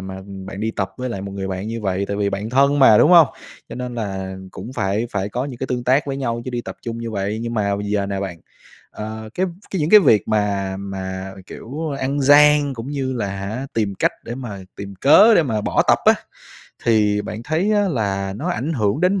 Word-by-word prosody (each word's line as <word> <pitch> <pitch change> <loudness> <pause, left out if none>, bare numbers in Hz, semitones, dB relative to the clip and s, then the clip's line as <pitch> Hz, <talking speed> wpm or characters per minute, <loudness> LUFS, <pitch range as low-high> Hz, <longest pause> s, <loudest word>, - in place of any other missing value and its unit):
mà 95 0 -7 0.3
bạn 95 +1 -7
đi 110 +1 -1
tập 95 -3 -3
với 130 0 -4
lại 115 -5 -4
một 100 0 -6
người 95 -1 -4
bạn 95 +3 -4
như 115 0 -4
vậy 95 -1 -1
tại 100 - -2
vì 100 -1 0
bạn 100 +3 -4
thân 140 +3 +3
mà, 110 -6 +7
đúng 155 - +5
hông? 170 -4 +8 0.4
Cho - - -7
nên 125 -1 -5
là 95 -4 -4
cũng 120 - -8
phải 105 0 -1
phải 100 0 -2
có 125 +5 -3
những 135 -4 -7
cái 130 - -3
tương 125 -2 -3
tác 135 +4 +2
với 135 - -3
nhau 120 -3 -2
chứ 130 - -4
đi 120 -1 -2
tập - - -8
chung 115 -1 -5
như 115 0 -5
vậy. 100 +1 -2
Nhưng 115 0 -4
mà 100 -2 0
giờ 100 -1 -1
nè 100 -1 -3
bạn, 90 -4 -5 0.5
ờ, 110 +1 -7
cái 185 +1 0 0.2
cái 190 - -2
những 150 - 0
cái 215 - +9
việc 115 - +3
mà 100 -3 0
mà, 95 -1 -6
kiểu, 150 +5 -6
ăn 140 +2 -1
gian 145 0 +5
cũng 115 +2 -7
như 135 -2 -2
là, 115 -5 -2
hả, 100 +7 -4
tìm 105 -3 0
cách - - +1
để 120 - -5
mà 120 -6 -6 0.2
tìm 100 0 -7
cớ 175 - +6
để 170 - +5
mà 110 -7 -1
bỏ - - +1
tập - - +5
á. - - +7 0.7
Thì 105 -2 +3
bạn 110 +2 -6
thấy 165 - 0
á 205 -1 +2
là 100 - -1
nó 165 +9 -4
ảnh 165 -2 -2
hưởng 110 -1 0
đến 185 +2 +2
115 Hz, 240 wpm, -20 LUFS, 100-135 Hz, 0.7 s, cái